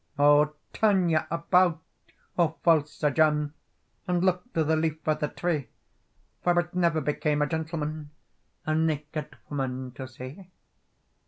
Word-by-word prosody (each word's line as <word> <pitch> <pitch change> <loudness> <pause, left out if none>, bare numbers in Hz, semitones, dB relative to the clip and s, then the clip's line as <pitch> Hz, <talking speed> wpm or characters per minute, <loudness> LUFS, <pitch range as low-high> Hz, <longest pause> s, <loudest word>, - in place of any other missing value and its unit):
"O 145 +1 +5 0.2
turn 195 -5 +3
you 160 -1 +4
about, 170 0 +3 0.6
O 165 -2 +2
false 155 -3 +4
Sir 150 -2 0
John, 150 -1 +2 0.5
And 175 0 +1
look 185 +6 0
to 160 - +2
the 160 +1 +2
leaf 160 -1 0
of 155 -1 +2
the 150 - 0
tree, 155 -5 -2 0.8
For 175 0 +3
it 175 0 -3
never 170 -3 +2
became 150 +1 0
a - - +2
gentleman 155 -1 -3 0.6
A 155 - 0
naked 155 -1 -2
woman 130 -2 -3
to 130 +1 -7
see." 130 +8 -10
155 Hz, 145 wpm, -27 LUFS, 150-170 Hz, 0.8 s, O